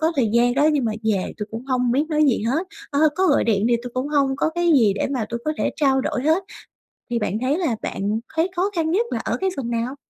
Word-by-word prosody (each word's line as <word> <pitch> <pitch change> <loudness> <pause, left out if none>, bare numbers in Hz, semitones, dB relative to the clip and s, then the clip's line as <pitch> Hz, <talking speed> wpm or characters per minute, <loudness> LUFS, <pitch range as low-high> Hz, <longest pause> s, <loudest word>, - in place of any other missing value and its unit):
có 320 +2 +2
thời 235 -5 +2
gian 240 +1 +3
đó 290 +2 +3
nhưng 280 -5 +1
mà 220 - 0
về 205 -4 0
tui 210 - -4
cũng 230 +3 -6
không 250 -2 +1
biết 285 +4 +2
nói 305 -1 +2
gì 250 -6 +2
hết, 310 +11 0 0.2
à, 285 - 0 0.2
có 380 - +2
gọi 290 - +3
điện 215 -1 +1
thì 240 - +3
tui 245 - -6
cũng 255 +3 -2
hông 280 -2 +1
có 315 - 0
cái 345 -1 +2
gì 220 -7 +5
để 200 - -1
mà 250 -6 -1
tui 235 - -3
có 310 - 0
thể - - 0
trao 270 -3 +2
đổi 255 - -2
hết? 320 +6 +2 0.7
Thì 235 - 0
bạn 210 -1 -1
thấy 270 +4 +1
là 330 -11 0
bạn 205 +3 -2 0.2
thấy 330 +4 +2
khó 370 +3 +1
khăn 320 -1 0
nhất 445 +6 +2
là - - -1
ở - - -2
cái 380 - +2
phần 250 -4 -4
nào? 235 +3 -2
265 Hz, 280 wpm, -22 LUFS, 235-315 Hz, 0.7 s, gì